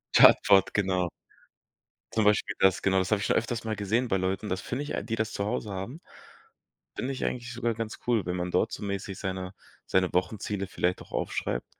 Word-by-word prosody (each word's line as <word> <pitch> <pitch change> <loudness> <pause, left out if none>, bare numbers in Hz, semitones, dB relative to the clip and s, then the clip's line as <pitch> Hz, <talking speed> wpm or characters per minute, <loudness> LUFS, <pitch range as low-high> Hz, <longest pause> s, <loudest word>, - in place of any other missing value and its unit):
Chartboard, 100 -2 +7
genau. 95 -3 +1 1.0
Zum 110 -1 +2
Beispiel 105 -1 +3
das, 95 -1 +4
genau, 95 -1 +3
das 95 - -1
habe 105 -2 +2
ich - - -1
schon - - +2
öfters 115 +1 -1
mal 110 -1 -2
gesehen 110 +5 0
bei 95 - +1
Leuten. 95 +3 -1
Das 95 -1 -2
finde 125 +3 -3
ich 145 - -5
ei - - -1
die 110 +2 -3
das 110 -1 -1
zu 100 - -2
Hause 105 0 -2
haben, 95 - -5 1.0
finde 130 - -2
ich 130 - -3
eigentlich 125 0 -3
sogar 120 -1 -1
ganz 110 0 -4
cool, 115 -5 +3
wenn 90 - -1
man 90 0 -2
dort 110 +5 +2
so - - -6
mäßig 100 -1 -4
seine 95 -1 -4 0.3
seine 95 -1 +2
Wochenziele 100 +1 -1
vielleicht 90 -1 -1
auch - - -14
aufschreibt, - - -2
100 Hz, 210 wpm, -28 LUFS, 95-115 Hz, 1.0 s, Chartboard